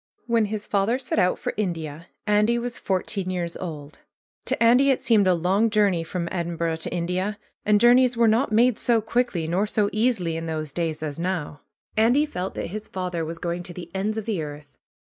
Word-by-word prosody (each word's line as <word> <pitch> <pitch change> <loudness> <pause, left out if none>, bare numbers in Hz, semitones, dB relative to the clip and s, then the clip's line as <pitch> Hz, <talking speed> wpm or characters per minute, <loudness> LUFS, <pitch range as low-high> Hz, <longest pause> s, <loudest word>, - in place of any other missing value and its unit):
When 230 -2 +2
his 210 0 -4
father 205 +4 +1
set 260 -4 -2
out 180 -1 +2
for - - -3
India 165 -5 -3 0.2
Andy 210 +3 +3
was 235 0 -4
fourteen 190 0 -2
years 175 -2 -3
old. 155 -4 -7 0.5
To - - 0
Andy 250 +4 +5
it 265 - +3
seemed 215 -5 +3
a 185 - +4
long 190 +7 +2
journey 200 -5 +2
from 170 +1 -4
Edin 170 -2 -2
burgh 165 -1 -1
to - - -4
India. 180 +4 -2 0.3
And 210 -1 +5
journeys 245 +1 +5
were 230 -1 +5
not 225 +3 +2
made 235 +2 +3
so 235 -2 +3
quickly 220 -7 -1
nor 185 +6 +1
so 205 -1 +1
easily 215 -8 +1
in 165 0 -4
those 155 -3 -4
days 160 -2 -2
as 150 0 -4
now. 170 -5 -3 0.3
Andy 245 +7 +4
felt 190 -11 -5
that - - -4
his 215 0 -5
father 180 -3 -3
was 165 +1 -5
going 175 +1 -3
to 175 0 -8
the 175 -2 -8
ends 205 +3 -1
of 220 - -3
the 210 -7 -1
earth. 145 -2 -8
190 Hz, 205 wpm, -24 LUFS, 170-220 Hz, 0.5 s, Andy